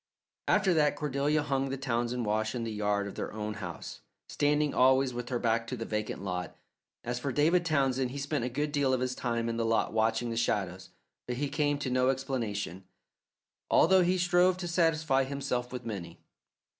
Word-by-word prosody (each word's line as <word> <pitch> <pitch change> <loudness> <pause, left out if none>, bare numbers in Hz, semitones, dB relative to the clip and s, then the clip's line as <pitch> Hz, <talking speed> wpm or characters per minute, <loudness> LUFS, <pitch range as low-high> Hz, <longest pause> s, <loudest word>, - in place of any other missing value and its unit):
After 190 -3 +3
that 150 -2 +3
Cordelia 145 +1 0
hung 135 -2 -1
the 135 - -3
Townsend 120 -2 -1
wash 110 +1 0
in 120 - -2
the 115 - -3
yard 105 -1 0
of 100 - -6
their - - -4
own 105 0 -4
house, 95 -6 -7 0.3
standing 150 0 +1
always 130 0 +4
with 120 0 -5
her 125 - 0
back 115 -1 0
to 125 - -4
the 115 - -4
vacant 105 -3 -3
lot. 90 -2 -4 0.5
As 120 +1 -3
for 140 +2 -2
David 165 +6 +3
Townsend, 135 -5 +1
he 135 - -6
spent 140 -1 -2
a 125 - -1
good 145 +4 -2
deal 140 -3 +2
of - - -2
his 130 0 -1
time 115 -2 -2
in 115 0 -2
the 115 - 0
lot 115 -1 +1
watching 115 +2 +1
the 115 - -3
shadows, 95 -5 -1 0.4
but 125 0 -3
he 145 +1 -1
came 145 0 +1
to 140 -3 -3
no 130 +1 +3
explanation, 115 - -2 0.9
although 190 +3 +5
he 180 +1 +2
strove 175 +1 +3
to 180 -1 -4
satisfy 160 -5 +2
himself 130 -3 -3
with 125 -1 -6
many. 100 -7 -6
130 Hz, 195 wpm, -30 LUFS, 115-145 Hz, 0.9 s, although